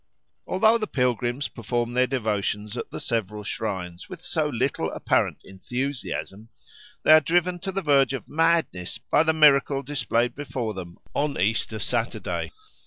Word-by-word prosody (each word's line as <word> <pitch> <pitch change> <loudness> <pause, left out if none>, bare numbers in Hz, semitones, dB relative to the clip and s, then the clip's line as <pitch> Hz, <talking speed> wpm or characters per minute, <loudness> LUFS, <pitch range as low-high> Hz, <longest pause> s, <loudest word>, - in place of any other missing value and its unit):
Although 220 +5 +4
the 215 - -2
pilgrims 125 - 0
perform 120 +1 -3
their 125 +1 +3
devotions 105 -4 -1
at - - -5
the - - -6
several 105 -2 -2
shrines 95 -5 -4
with 175 -2 -9
so 155 -3 0
little 125 - -1
apparent - - +1
enthusiasm, 115 0 -5 0.5
they - - +5
are 155 - +8
driven 175 +3 +1
to 190 - -4
the 195 0 -3
verge 140 -3 +4
of 135 - -5
madness 165 - +1
by 150 - +2
the 160 0 +3
miracle 140 -2 +5
displayed 120 -4 0
before 130 -6 -4
them 90 -3 -8 0.2
on 145 0 -1
Easter 110 +2 +1
Saturday. 115 +3 -2
125 Hz, 150 wpm, -25 LUFS, 110-150 Hz, 0.5 s, are